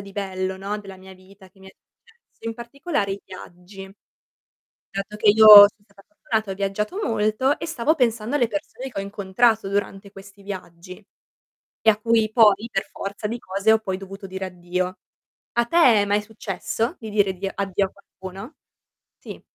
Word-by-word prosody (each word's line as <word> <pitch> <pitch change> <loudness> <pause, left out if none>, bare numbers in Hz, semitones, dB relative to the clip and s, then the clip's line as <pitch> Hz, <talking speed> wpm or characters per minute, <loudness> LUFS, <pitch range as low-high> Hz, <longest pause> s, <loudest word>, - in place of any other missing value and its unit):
di 200 0 -11
bello, 190 -1 -4
no, 200 +2 -4
della 195 -2 -11
mia 190 0 -14
vita 190 +1 -19
che 195 - -27
mi 190 - -15
è - - -17
successo, 455 - -15
in 225 - -5
particolare 235 - -3
i 200 - -6
viaggi. 190 +1 -12 1.0
Dato 195 +2 -5
che 210 - +1
io 220 +1 +6 0.2
son - - -4
stata 200 -1 -22
fortunata, 220 -9 -3
ho - - -6
viaggiato 200 - -3
molto 220 +5 0
e - - -5
stavo 315 0 0
pensando 235 0 0
alle 245 -4 +2
persone 265 0 -6
che 195 - -5
ho - - -4
incontrato 200 +2 0
durante 200 0 -3
questi 195 0 -15
viaggi, 185 0 -9 0.8
e 220 - -1
a 210 - +6
cui 225 -1 +1
poi 220 -1 +4
per 195 -2 -3
forza 200 +1 -5
di 235 +3 -4
cose 200 +1 -1
ho 220 - +4
poi 190 -4 -4
dovuto 195 +1 -10
dire 190 0 -5
addio. 180 +1 -4 0.5
A 235 - +1
te 330 - -3 0.3
è - - 0
mai 205 +1 +1
successo 220 - -4
di 220 -2 -8
dire 205 -2 +2
addi 190 +1 -4
addio 195 0 -1
a - - -13
qualcuno? 195 +6 -11 0.6
Sì. - - -10
200 Hz, 180 wpm, -22 LUFS, 195-225 Hz, 1.0 s, io